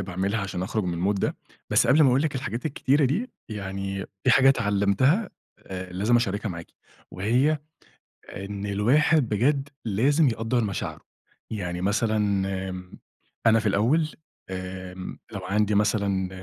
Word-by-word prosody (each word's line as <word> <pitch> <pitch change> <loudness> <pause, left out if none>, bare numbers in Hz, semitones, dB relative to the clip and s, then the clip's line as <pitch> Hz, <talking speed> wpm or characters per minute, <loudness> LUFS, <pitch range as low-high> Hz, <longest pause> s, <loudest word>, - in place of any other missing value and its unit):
باعملها 95 +3 -2
عشان 95 -2 -3
أخرُج 110 +1 -1
من 90 +3 0
الmood - - -3
ده، - - -1 0.3
بس - - +4
قبل 145 +6 +5
ما 140 - +6
أقول 130 +3 +3
لِك 155 -2 -1
الحاجات 125 -1 -3
الكتيرة 145 0 +2
دي، 190 - 0 0.2
يعني 95 -2 -4 0.2
فيه 130 - +5
حاجة 135 +1 +6
اتعلمتها 120 - +2 0.4
آآ، 95 -1 -6
لازم 105 +7 +2
أشاركها 105 -3 -1
معاكِ، 85 -3 -6 0.4
وهي 125 +11 +1 0.8
إن 100 +1 -5
الواحد 125 +7 +3
بجد 135 +6 +1 0.2
لازم 135 +9 +3
يقدَّر 115 +1 0
مشاعره، 100 -3 -4 0.5
يعني 90 -5 -4
مثلًا 110 +3 +1 0.5
آمم، 90 0 -9 0.5
أنا 115 0 +6
في 110 - -1
الأول 125 +11 +2 0.4
آمم، 95 0 -6
لو 100 - -5
عندي 105 +2 +1
مثلًا 100 -2 +1
105 Hz, 140 wpm, -25 LUFS, 95-130 Hz, 0.8 s, ما